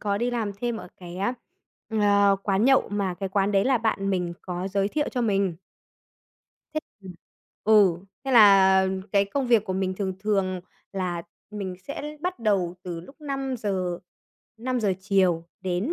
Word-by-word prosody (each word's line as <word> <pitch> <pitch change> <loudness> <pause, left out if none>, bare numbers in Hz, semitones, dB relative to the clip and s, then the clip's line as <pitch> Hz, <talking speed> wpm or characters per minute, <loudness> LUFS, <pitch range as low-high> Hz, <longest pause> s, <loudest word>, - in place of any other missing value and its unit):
có 200 -1 -1
đi 240 +2 0
làm 225 -4 -2
thêm 240 -1 -1
ở 215 - -8
cái 175 -1 -9
á, 200 +6 -1 0.6
ờ, 200 -2 +4
quán 200 +2 +1
nhậu 270 0 +4
mà 200 -3 -1
cái 195 +1 -4
quán 200 +1 +1
đấy 195 -1 +3
là 260 -2 +3
bạn 195 -3 0
mình 180 -2 -1
có 180 +1 -4
giới 195 0 0
thiệu 295 +7 -1
cho 250 - -2
mình. 195 -5 +1 1.2
Thế 310 - 0 0.2
ừm. 190 -1 -8 0.5
Ừ, 205 -5 +5 0.3
thế 270 - -2
là 195 -4 +7 0.3
cái 200 -1 +4
công 260 +7 -2
việc 230 -4 +4
của 190 - -3
mình 185 0 -1
thường 190 -1 -3
thường 195 -3 0 0.3
là 180 -3 -2 0.3
mình 200 -3 -5
sẽ 300 +1 -5
bắt 360 +2 -3
đầu 195 -6 +1
từ 175 -2 -5
lúc 275 - -15
5:00, 225 -11 -2 0.6
5:00 235 -4 0
chiều 185 -4 +2 0.2
đến 185 - -1
200 Hz, 170 wpm, -25 LUFS, 185-225 Hz, 1.2 s, là